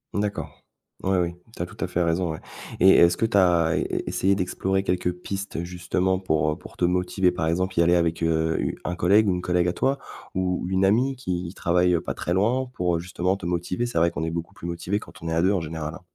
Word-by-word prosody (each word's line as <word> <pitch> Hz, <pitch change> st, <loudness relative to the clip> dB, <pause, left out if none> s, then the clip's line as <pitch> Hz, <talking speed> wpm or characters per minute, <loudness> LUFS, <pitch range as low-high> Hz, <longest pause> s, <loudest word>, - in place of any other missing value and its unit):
D'accord. 105 Hz, 0 st, -3 dB, 0.4 s
Ouais, 95 Hz, 0 st, +2 dB
oui, 85 Hz, -1 st, -1 dB, 0.2 s
tu -, -, -6 dB
as -, -, 0 dB
tout -, -, -14 dB
à 95 Hz, -, -1 dB
fait 90 Hz, -, -1 dB
raison, 85 Hz, 0 st, 0 dB
ouais, -, -, -7 dB, 0.4 s
et 95 Hz, -, +8 dB
est-ce 85 Hz, -2 st, +6 dB
que -, -, 0 dB
tu 105 Hz, -2 st, +1 dB
as 85 Hz, -3 st, +4 dB
e -, -, +2 dB
e -, -, -3 dB
essayé 100 Hz, +1 st, +2 dB
d'explorer 95 Hz, +1 st, -1 dB
quelques 90 Hz, -1 st, 0 dB
pistes 95 Hz, 0 st, -5 dB
justement 90 Hz, +1 st, -1 dB
pour, 80 Hz, -5 st, +1 dB
heu, 75 Hz, -, -4 dB
pour -, -, -13 dB
te -, -, -4 dB
motiver? 90 Hz, +1 st, +2 dB
Par 80 Hz, -2 st, -2 dB
exemple, 90 Hz, +2 st, 0 dB
y 85 Hz, -, +6 dB
aller 85 Hz, +1 st, +4 dB
avec, 85 Hz, -1 st, +1 dB
heu, 80 Hz, 0 st, +1 dB
u -, -, -1 dB
un 90 Hz, -, -2 dB
collègue 100 Hz, +5 st, +4 dB
ou -, -, +4 dB
une 90 Hz, -, -1 dB
collègue 90 Hz, -1 st, +1 dB
à -, -, +1 dB
toi 135 Hz, +6 st, +1 dB, 0.4 s
ou 90 Hz, -1 st, 0 dB
ou -, -, -4 dB
une 95 Hz, 0 st, +1 dB
amie 125 Hz, +7 st, +3 dB
qui 90 Hz, -6 st, -4 dB
travaille, 90 Hz, +1 st, +2 dB
heu, 85 Hz, -, +1 dB
pas -, -, -3 dB
très 85 Hz, -, -2 dB
loin 120 Hz, +7 st, +2 dB
pour, 90 Hz, -6 st, 0 dB
heu, -, -, -4 dB
justement 90 Hz, +2 st, -1 dB
te 90 Hz, -, -8 dB
motiver? 90 Hz, +6 st, -1 dB
C'est 120 Hz, -, -4 dB
vrai 85 Hz, +1 st, +3 dB
qu'on 80 Hz, -, -4 dB
est 80 Hz, -, -2 dB
beaucoup 85 Hz, 0 st, -5 dB
plus 85 Hz, -, -7 dB
motivés 85 Hz, +4 st, -2 dB
quand -, -, -14 dB
on 85 Hz, -, -4 dB
est 80 Hz, -, -1 dB
à 80 Hz, -, +2 dB
2 95 Hz, +3 st, +3 dB
en 95 Hz, -, 0 dB
général, 80 Hz, 0 st, -5 dB
hein. 90 Hz, -, -10 dB
90 Hz, 265 wpm, -25 LUFS, 85-95 Hz, 0.4 s, et